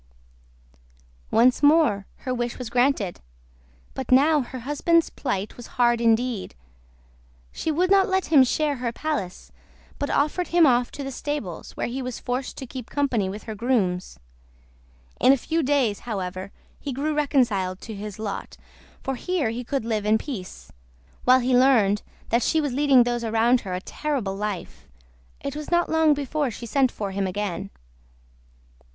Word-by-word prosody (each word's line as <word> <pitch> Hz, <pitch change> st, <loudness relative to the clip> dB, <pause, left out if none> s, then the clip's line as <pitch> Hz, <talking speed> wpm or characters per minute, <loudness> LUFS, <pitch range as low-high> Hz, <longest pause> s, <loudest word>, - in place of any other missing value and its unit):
Once 245 Hz, +2 st, +4 dB
more 290 Hz, -10 st, +4 dB
her 255 Hz, -, -4 dB
wish 240 Hz, -1 st, -3 dB
was 245 Hz, -3 st, -6 dB
granted, 245 Hz, -7 st, +1 dB, 0.7 s
but 265 Hz, -, -6 dB
now 295 Hz, +4 st, +5 dB
her 255 Hz, 0 st, -7 dB
husband's 315 Hz, +5 st, +2 dB
plight 210 Hz, -7 st, -3 dB
was 245 Hz, -, -9 dB
hard 240 Hz, -1 st, +3 dB
indeed. 230 Hz, -, +1 dB, 1.0 s
She -, -, -3 dB
would 360 Hz, +5 st, +1 dB
not 390 Hz, -1 st, +5 dB
let 380 Hz, -1 st, +1 dB
him 275 Hz, -3 st, +8 dB
share 290 Hz, +2 st, 0 dB
her 245 Hz, -1 st, -2 dB
palace, 235 Hz, -9 st, -4 dB, 0.5 s
but 285 Hz, -, -2 dB
ordered 305 Hz, +5 st, +1 dB
him 340 Hz, -1 st, +5 dB
off 245 Hz, -3 st, +3 dB
to 285 Hz, -, -6 dB
the 270 Hz, -, -5 dB
stables, 265 Hz, -, -5 dB
where -, -, -1 dB
he 255 Hz, +3 st, -4 dB
was 250 Hz, -2 st, -5 dB
forced 250 Hz, +1 st, -3 dB
to 265 Hz, -, -6 dB
keep 250 Hz, -1 st, -8 dB
company 250 Hz, -9 st, 0 dB
with 205 Hz, +3 st, -7 dB
her 220 Hz, -, -6 dB
grooms. 200 Hz, -, -1 dB, 1.0 s
In 265 Hz, -, +6 dB
a -, -, +2 dB
few 325 Hz, +6 st, -1 dB
days, 265 Hz, -7 st, +1 dB
however, 190 Hz, -3 st, -5 dB, 0.3 s
he 285 Hz, -, -5 dB
grew 290 Hz, +4 st, -1 dB
reconciled 240 Hz, -11 st, +1 dB
to 225 Hz, -, -7 dB
his 205 Hz, -1 st, -7 dB
lot, 215 Hz, -2 st, -5 dB, 0.5 s
for 270 Hz, -, -2 dB
here 305 Hz, -3 st, -1 dB
he 240 Hz, +2 st, -4 dB
could 265 Hz, -1 st, -2 dB
live 215 Hz, -2 st, -1 dB
in 215 Hz, +1 st, +4 dB
peace, 220 Hz, -8 st, -8 dB, 0.5 s
while 255 Hz, +1 st, +6 dB
he 250 Hz, +1 st, +2 dB
learned 230 Hz, -6 st, +4 dB, 0.3 s
that 235 Hz, +2 st, +2 dB
she 320 Hz, -, +2 dB
was 290 Hz, -4 st, -1 dB
leading 275 Hz, -2 st, +5 dB
those 240 Hz, 0 st, -2 dB
around 230 Hz, +2 st, +3 dB
her 185 Hz, -, -5 dB
a -, -, -2 dB
terrible 255 Hz, -7 st, -3 dB
life, 195 Hz, -, -5 dB, 0.5 s
it 280 Hz, 0 st, -4 dB
was 300 Hz, 0 st, -6 dB
not 345 Hz, 0 st, +2 dB
long 320 Hz, -2 st, +4 dB
before 290 Hz, 0 st, -1 dB
she 235 Hz, +1 st, -8 dB
sent 260 Hz, +2 st, +2 dB
for 200 Hz, -2 st, -4 dB
him 195 Hz, 0 st, -1 dB
again. 195 Hz, 0 st, -3 dB
250 Hz, 165 wpm, -24 LUFS, 215-285 Hz, 1.0 s, him